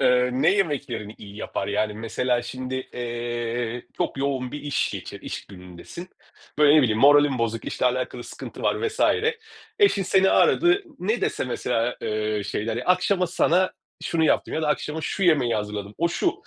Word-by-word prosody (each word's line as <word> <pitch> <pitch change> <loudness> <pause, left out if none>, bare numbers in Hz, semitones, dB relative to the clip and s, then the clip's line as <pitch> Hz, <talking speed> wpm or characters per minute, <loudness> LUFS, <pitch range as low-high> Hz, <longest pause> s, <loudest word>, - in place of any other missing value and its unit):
eee, 125 0 +3
ne 135 +7 +3
yemeklerini 130 - -2
iyi 100 0 -11
yapar? 100 - -4
Yani, 105 +1 0
mesela 120 +2 -1
şimdi, 130 +1 -5 0.2
eee, 120 0 -3
çok - - -2
yoğun 135 -2 -2
bir 150 - -5
iş 145 -2 0
geçir - - -7
iş - - -6
günündesin. 90 - -10 0.5
Böyle, 150 0 +6
ne 155 - +6
bileyim, 110 -4 +1
moralin 145 -1 +6
bozuk, 115 -1 -1
işle - - -1
alakalı 125 -1 -2
sıkıntı - - -9
var 450 - +1
vs. 435 +3 -9 0.8
Eşin 400 - +4
seni 190 +1 +3
aradı, 350 +3 +4 0.2
ne 215 +6 -1
dese - - -1
mesela, 125 -1 -1
eee, 105 -1 -1
şeyler 110 +2 -2
ya, 120 - -4
akşama 180 +1 +2
sana 180 +1 +2 0.3
şunu 165 -1 +1
yaptım - - +1
ya 160 - -1
da 155 - 0
akşama 150 +1 -1
şu 195 - -3
yemeği 145 -10 +3
hazırladım, 105 -1 -4
o, 170 +2 +2
şu: 335 - 0
125 Hz, 170 wpm, -24 LUFS, 115-160 Hz, 0.8 s, Böyle